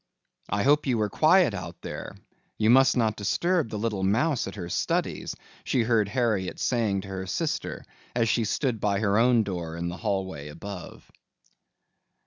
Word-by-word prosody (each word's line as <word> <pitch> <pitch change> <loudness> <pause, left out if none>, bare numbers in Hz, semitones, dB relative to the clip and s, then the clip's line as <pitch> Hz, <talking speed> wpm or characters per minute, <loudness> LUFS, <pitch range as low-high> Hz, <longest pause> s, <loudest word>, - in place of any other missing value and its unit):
"I 100 +1 0
hope 145 +2 +3
you 125 -3 +2
were 105 -2 0
quiet 170 - +4
out 90 -3 -6
there. - - -6 0.4
You 110 +1 +4
must 135 +1 +5
not 110 -3 +2
disturb 160 - 0
the 110 - -4
little 105 -2 -2
mouse 115 +9 +1
at 95 - -7
her 90 -4 -5
studies," 65 -7 -1 0.3
she 125 - +1
heard 115 -3 +2
Harriet 105 -5 0
saying 110 -6 +1
to 100 - -10
her 95 -1 -5
sister 155 - -3 0.3
as 115 -2 +2
she 115 0 +1
stood 120 +1 -1
by 100 -1 +1
her 100 0 +2
own 120 -1 +4
door 85 -5 -4
in 85 +1 -3
the 90 - -6
hallway 95 -9 -3
above. 90 +4 -9
105 Hz, 170 wpm, -26 LUFS, 95-120 Hz, 0.4 s, must